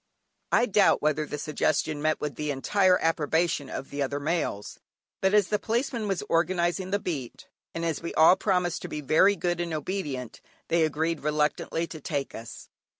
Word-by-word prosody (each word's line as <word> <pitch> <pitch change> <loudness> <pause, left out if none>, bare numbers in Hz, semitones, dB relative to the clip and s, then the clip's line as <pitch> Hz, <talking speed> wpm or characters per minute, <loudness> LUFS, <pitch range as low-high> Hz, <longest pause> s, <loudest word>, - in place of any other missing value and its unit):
I 240 - +4
doubt 205 -7 +3
whether 150 0 +1
the 150 - -4
suggestion 150 0 -1
met 155 +1 +1
with 150 -1 -3
the 150 +3 -4
entire 185 +7 +3
approbation 160 -2 +1
of 135 - -6
the 145 0 -3
other 140 +1 -1
males, 145 -9 -2 0.4
but 190 +2 +3
as 205 -3 +4
the 210 - +1
Policeman 235 -1 -1
was 195 -3 -1
organising 175 +1 +1
the 200 - +1
beat, 150 -11 -5 0.3
and 165 0 -2
as 165 -3 -2
we 170 - -4
all 160 +3 +7
promised 180 -3 0
to - - -5
be 150 -3 -5
very 165 +8 +4
good 175 -2 -1
and 170 -2 -3
obedient, 145 - -4 0.3
they 165 -1 +3
agreed 155 +1 -1
reluctantly 150 +2 0
to 160 -2 -10
take 140 -2 -3
us. 115 +1 -9
165 Hz, 180 wpm, -27 LUFS, 150-185 Hz, 0.4 s, all